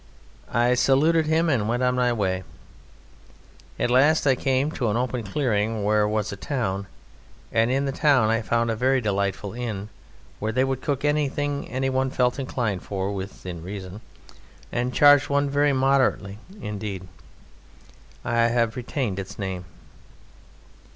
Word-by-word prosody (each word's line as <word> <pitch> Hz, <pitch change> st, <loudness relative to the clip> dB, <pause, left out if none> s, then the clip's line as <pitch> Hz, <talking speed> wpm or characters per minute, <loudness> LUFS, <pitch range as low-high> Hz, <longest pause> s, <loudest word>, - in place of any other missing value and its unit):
I 120 Hz, +2 st, +3 dB
saluted 150 Hz, +6 st, +3 dB
him 160 Hz, +2 st, +2 dB
and 115 Hz, -8 st, +1 dB
went 120 Hz, +2 st, 0 dB
on 125 Hz, 0 st, +2 dB
my 125 Hz, -1 st, +2 dB
way. 95 Hz, -5 st, -1 dB, 1.3 s
At 120 Hz, -, 0 dB
last 145 Hz, +6 st, +4 dB
I 135 Hz, -, +5 dB
came 135 Hz, +3 st, 0 dB
to 120 Hz, -7 st, -1 dB
an 105 Hz, -, 0 dB
open 125 Hz, 0 st, -1 dB
clearing, 110 Hz, -1 st, -1 dB
where 105 Hz, +1 st, +2 dB
there 105 Hz, -, +3 dB
was 105 Hz, 0 st, -1 dB
a -, -, -5 dB
town, 100 Hz, -4 st, -3 dB, 0.6 s
and 115 Hz, +1 st, +2 dB
in 135 Hz, +2 st, +1 dB
the 135 Hz, -, -1 dB
town 135 Hz, -6 st, +3 dB
I 115 Hz, +1 st, +1 dB
found 115 Hz, +1 st, 0 dB
a -, -, -1 dB
very 130 Hz, +4 st, +2 dB
delightful 100 Hz, -2 st, -2 dB
inn, 110 Hz, -4 st, -5 dB, 0.5 s
where 110 Hz, +1 st, -1 dB
they 130 Hz, +3 st, +2 dB
would 135 Hz, -1 st, -2 dB
cook 145 Hz, -1 st, -2 dB
anything 145 Hz, -1 st, 0 dB, 0.3 s
one 130 Hz, 0 st, +1 dB
felt 125 Hz, 0 st, 0 dB
inclined 115 Hz, -8 st, -2 dB
for, 100 Hz, 0 st, -3 dB
within 95 Hz, -3 st, -7 dB
reason, 95 Hz, +2 st, -7 dB, 0.7 s
and 125 Hz, +1 st, -1 dB
charged 145 Hz, +1 st, +6 dB
one 140 Hz, 0 st, +1 dB
very 145 Hz, +1 st, +3 dB
moderately 130 Hz, -7 st, +1 dB, 0.2 s
indeed. 100 Hz, -3 st, -5 dB, 1.2 s
I 115 Hz, 0 st, +2 dB
have 115 Hz, -1 st, +1 dB
retained 125 Hz, -, -3 dB
its 95 Hz, 0 st, -7 dB
name. 95 Hz, -3 st, -4 dB
120 Hz, 150 wpm, -24 LUFS, 105-135 Hz, 1.3 s, charged